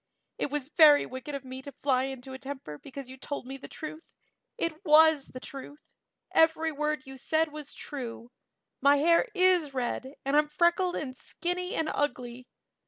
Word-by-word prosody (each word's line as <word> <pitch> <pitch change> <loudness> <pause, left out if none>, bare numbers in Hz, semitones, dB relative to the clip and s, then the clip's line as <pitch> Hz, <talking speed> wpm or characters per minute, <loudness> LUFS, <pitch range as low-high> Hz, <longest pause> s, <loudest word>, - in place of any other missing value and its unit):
It - - -1
was 290 -1 -3
very 305 -3 +7
wicked 260 +3 -6
of 275 -1 -6
me 260 0 -7
to 280 - -9
fly 265 -2 +1
into 265 -1 -7
a 260 - -7
temper 265 - -7
because 275 -1 -9
you 260 +1 -10
told 285 0 -5
me 265 +1 -6
the 270 - -10
truth. 310 +1 -9 0.4
It 335 +2 -3
was 315 -3 +6
the 255 - -9
truth; 275 +2 -10 0.4
every 320 0 +3
word 300 -1 -2
you 270 0 -9
said 315 +3 +1
was 300 -1 -7
true. 245 -4 -7 0.5
My 280 +1 +6
hair 335 - +4
is 365 -6 +3
red 260 +2 -3
and 275 +1 +1
I'm 300 0 +4
freckled 345 +4 +2
and 260 -4 -4
skinny 360 +6 -3
and 320 - 0
ugly. 250 -4 -2
285 Hz, 175 wpm, -29 LUFS, 265-315 Hz, 0.5 s, very